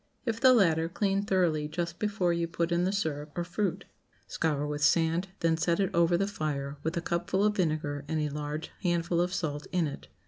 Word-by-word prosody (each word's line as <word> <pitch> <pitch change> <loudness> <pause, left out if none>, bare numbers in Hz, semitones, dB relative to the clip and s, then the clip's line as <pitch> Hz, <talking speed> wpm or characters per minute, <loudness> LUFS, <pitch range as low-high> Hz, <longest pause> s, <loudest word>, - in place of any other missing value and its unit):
If 230 -2 -2
the 260 - +8
latter, 165 -8 +3
clean 195 +2 0
thoroughly 175 -7 +1
just 170 +2 -4
before 200 -5 +1
you 170 0 -1
put 170 0 -2
in 170 +1 +2
the 190 - +1
syrup 150 -7 -3
or 175 - 0
fruit. 180 +1 -2 0.4
Scour 150 -3 -1
with 150 0 -3
sand, 165 +3 +3
then 165 -1 +2
set 170 +2 +1
it 195 -2 0
over 170 0 +4
the 195 - +1
fire, 150 -7 -3
with 160 +4 -2
a - - 0
cupful 175 +3 0
of 210 0 +2
vinegar 155 -5 -1
and 160 - -1
a 150 -1 0
large 150 +1 -4
handful 170 -1 +1
of 180 +1 0
salt 150 -5 -3
in 180 -2 +2
it. 145 - -6
170 Hz, 210 wpm, -29 LUFS, 155-185 Hz, 0.4 s, the